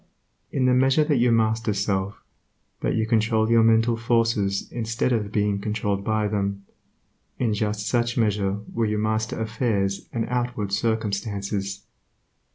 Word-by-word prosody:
In 130 -2 0
the 130 - +4
measure 135 +4 +4
that 150 -2 +1
you 120 0 +4
master 110 -1 +1
self, 100 0 -2 0.6
that - - -1
you 110 -1 +1
control 110 0 +2
your 115 -1 +6
mental 115 +1 +4
forces 115 -4 +1
instead 115 +2 -1
of 105 -3 -1
being 105 -1 +1
controlled 105 -1 -2
by 110 0 0
them, 100 -1 -2 0.7
in 115 -4 0
just 105 0 -2
such 120 -1 0
measure 105 -3 0
will 115 -2 0
you 105 - -1
master 110 +1 -1
affairs 110 -3 -1
and 115 -1 -1
outward 120 -5 -2
circumstances. 100 -2 -2
110 Hz, 145 wpm, -24 LUFS, 100-115 Hz, 0.7 s, your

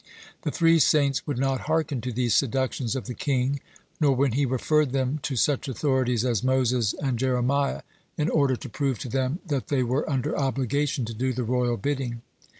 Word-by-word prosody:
The - - -2
three 165 -1 +4
saints 140 -2 +3
would 145 -4 -2
not 135 +1 -1
hearken 155 -5 0
to 125 - -3
these 120 0 0
seductions 130 -1 0
of 130 - -4
the 125 - -5
king, 135 +1 0 0.4
nor 140 -3 +3
when 135 0 +2
he 135 +3 +1
referred 135 +2 +1
them 135 +2 0
to 135 - -3
such 140 +4 +1
authorities 130 -3 0
as 120 -3 0
Moses 125 -3 +2
and 130 -4 -2
Jeremiah, 130 +2 +1 0.3
in 150 -1 +1
order 140 -6 +2
to 135 - -8
prove 135 +2 -1
to 125 - -6
them 135 - -1
that 145 -6 -2
they 135 -3 +1
were 130 +6 -1
under 130 -4 -1
obligation 135 0 0
to 115 - -6
do 130 +4 -1
the 125 +1 -2
royal 120 0 0
bidding. 125 -1 -3
130 Hz, 190 wpm, -26 LUFS, 125-140 Hz, 0.4 s, three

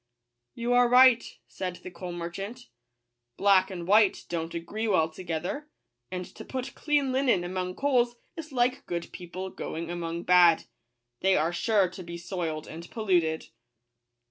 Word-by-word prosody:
" 120 0 -55
You 240 +1 0
are 245 0 +5
right," 250 -1 +7 0.2
said 185 -2 -5
the 185 - -7
coal 175 +1 -7
merchant: 175 - -6 0.3
" 120 0 -55
black 195 -1 +4
and 175 -3 -6
white 210 0 +4
don't 165 -1 -3
agree 210 +7 -3
well 160 -6 +2
together; 180 - -4 0.4
and 180 -1 -4
to - - -9
put 260 -1 -5
clean 290 -3 +1
linen 255 -8 +2
among 180 0 -3
coals 245 -4 +2 0.2
is 320 -2 -8
like 250 0 0
good 170 -1 -4
people 185 +1 -7
going 165 +1 -5
among 170 0 -4
bad 175 -2 +6 0.3
— 120 0 -54
they 190 0 +4
are 160 +3 +1
sure 205 +1 +2
to 185 +1 -9
be 170 -1 -7
soiled 170 -3 -4
and 170 +2 -9
polluted." 175 -8 0
180 Hz, 165 wpm, -28 LUFS, 170-230 Hz, 0.4 s, right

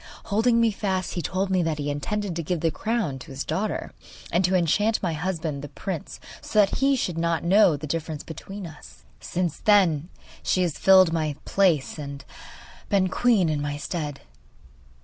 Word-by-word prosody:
Holding 230 +2 +3
me 230 -1 +4
fast, 190 -3 -2
he 175 - -2
told 190 +4 -2
me 185 -1 +3
that 165 -2 -1
he 145 0 -2
intended 195 +6 -3
to 170 - -2
give 165 0 -2
the 165 - +2
crown 215 - -2
to - - -12
his 135 +1 -5
daughter, 210 +3 -2 0.4
and 175 - +2
to 185 +1 +2
enchant 205 +6 +2
my 175 -3 0
husband 160 -3 -3
the 145 - -7
prince, 180 -1 -6 0.2
so - - -5
that 200 -2 +4
he 275 +1 +3
should 180 -9 -2
not 170 0 0
know 180 -3 +5
the 150 - -6
difference 155 0 -4
between 195 +5 -8
us. 155 -3 -13 0.2
Since 175 -3 -2
then 180 -7 +3 0.3
she 185 - +1
has 170 -4 -2
filled 185 -3 +6
my 155 -3 -1
place 170 -7 +2
and 140 -1 -7 0.6
been 195 -3 +2
queen 225 -7 +3
in 150 -2 -1
my 145 0 -3
stead. 150 -2 -4
175 Hz, 185 wpm, -25 LUFS, 155-195 Hz, 0.6 s, filled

